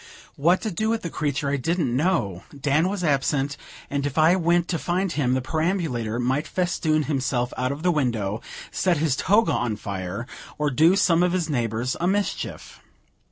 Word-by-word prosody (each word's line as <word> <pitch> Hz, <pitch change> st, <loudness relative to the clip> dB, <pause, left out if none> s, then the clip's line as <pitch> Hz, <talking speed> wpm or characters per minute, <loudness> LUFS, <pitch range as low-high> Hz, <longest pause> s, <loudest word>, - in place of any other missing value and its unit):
What 170 Hz, +6 st, +3 dB
to 220 Hz, -, -2 dB
do 215 Hz, +5 st, -1 dB
with 225 Hz, 0 st, -1 dB
the 170 Hz, -, -4 dB
creature 145 Hz, -2 st, -1 dB
I 145 Hz, -, +1 dB
didn't 155 Hz, -3 st, 0 dB
know; 130 Hz, -, 0 dB, 0.2 s
Dan 150 Hz, +6 st, +2 dB
was 195 Hz, -2 st, -3 dB
absent, 140 Hz, -1 st, +1 dB, 0.3 s
and 140 Hz, -1 st, -2 dB
if 145 Hz, 0 st, -3 dB
I 160 Hz, +3 st, +5 dB
went 175 Hz, -1 st, +2 dB
to 170 Hz, -, -1 dB
find 180 Hz, +1 st, -1 dB
him, 130 Hz, -6 st, +1 dB
the 130 Hz, -, -1 dB
perambulator 155 Hz, -, -1 dB
might 130 Hz, +5 st, 0 dB
festoon 165 Hz, -4 st, 0 dB
himself 130 Hz, -4 st, -1 dB
out 130 Hz, +1 st, -1 dB
of 145 Hz, +3 st, -6 dB
the 180 Hz, -, +4 dB
window, 115 Hz, -, -1 dB, 0.3 s
set 180 Hz, -3 st, +1 dB
his 150 Hz, -3 st, +1 dB
toga 210 Hz, +8 st, +3 dB
on 115 Hz, -3 st, 0 dB
fire, 100 Hz, +1 st, -5 dB, 0.3 s
or 150 Hz, -1 st, 0 dB
do 160 Hz, +8 st, +5 dB
some 170 Hz, -3 st, +3 dB
of 180 Hz, 0 st, +2 dB
his 170 Hz, -4 st, -1 dB
neighbors 120 Hz, -1 st, -1 dB
a 175 Hz, -, +2 dB
mischief. 200 Hz, +2 st, -2 dB
150 Hz, 185 wpm, -24 LUFS, 125-175 Hz, 0.3 s, I